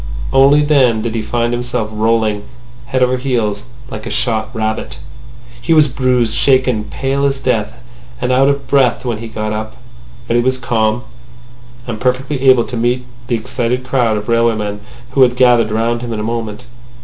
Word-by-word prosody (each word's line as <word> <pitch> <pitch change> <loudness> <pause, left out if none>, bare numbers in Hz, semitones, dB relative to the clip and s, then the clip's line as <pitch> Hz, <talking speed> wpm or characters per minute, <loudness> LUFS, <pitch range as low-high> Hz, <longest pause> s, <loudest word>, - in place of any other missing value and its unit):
Only 140 +2 +5
then 130 -7 +3
did 115 - -3
he 115 - -1
find 120 +2 -1
himself 120 -3 -3
rolling 110 -1 +1 0.5
head 130 +1 +1
over 125 0 +2
heels 115 -5 -1 0.3
like 110 0 -6
a - - -4
shot 110 -3 0
rabbit. 110 -2 -3 0.6
He 165 +6 +2
was 155 -1 +6
bruised, 125 -3 0
shaken, 130 -5 +2
pale 135 +5 -2
as 140 -1 +1
death, 115 -5 -1 0.5
and 125 +1 -1
out 135 +2 +4
of 140 -2 -2
breath 130 -2 +2
when 115 -3 -2
he 115 - -7
got 110 -1 -4
up. 110 0 -5 0.5
But 120 - +1
he - - +3
was 130 +1 0
calm, 115 -2 0 0.8
and 115 -3 -6
perfectly 130 +2 -1
able 130 -2 +5
to 125 - -6
meet 120 +2 0 0.2
the 120 - +1
excited 125 +2 -2
crowd 125 -4 +1
of 105 - -6
railway 115 -1 +2
men 105 -1 -4 0.3
who 135 - +2
had 125 -1 +5
gathered 120 -3 +4
round 115 +2 0
him 120 -1 -5
in 110 - -3
a - - -3
moment. 115 0 -4
120 Hz, 185 wpm, -16 LUFS, 110-130 Hz, 0.8 s, was